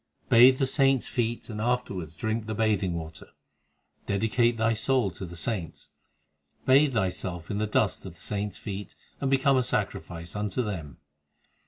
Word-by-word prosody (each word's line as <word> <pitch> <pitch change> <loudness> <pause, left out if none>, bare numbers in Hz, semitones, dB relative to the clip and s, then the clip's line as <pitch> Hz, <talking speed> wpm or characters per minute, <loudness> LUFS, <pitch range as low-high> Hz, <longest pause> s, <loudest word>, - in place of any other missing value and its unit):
6 - - -35
Bathe 125 +3 +8
the 135 - +2
saints 135 -1 +2
feet 120 -1 -2
and 105 -2 -5
afterwards 100 -9 -2
drink 110 +4 -2
the 110 - -3
bathing 100 -5 +1
water; 80 -1 -7 0.8
Dedicate 115 +4 +2
thy 115 +1 +2
soul 115 -2 +1
to 90 +2 -7
the 85 - -10
saints; 85 -2 -4 0.8
Bathe 135 +1 +5
thyself 90 -4 -2
in 100 - -1
the 110 - 0
dust 105 - +1
of - - -10
the - - -19
saints 105 0 -4
feet, 100 -2 -7 0.2
And 135 - 0
become 135 0 +3
a 130 - +3
sacrifice 85 -7 -3
unto 105 +4 -1
them. 80 - -5
110 Hz, 165 wpm, -27 LUFS, 95-125 Hz, 0.8 s, Bathe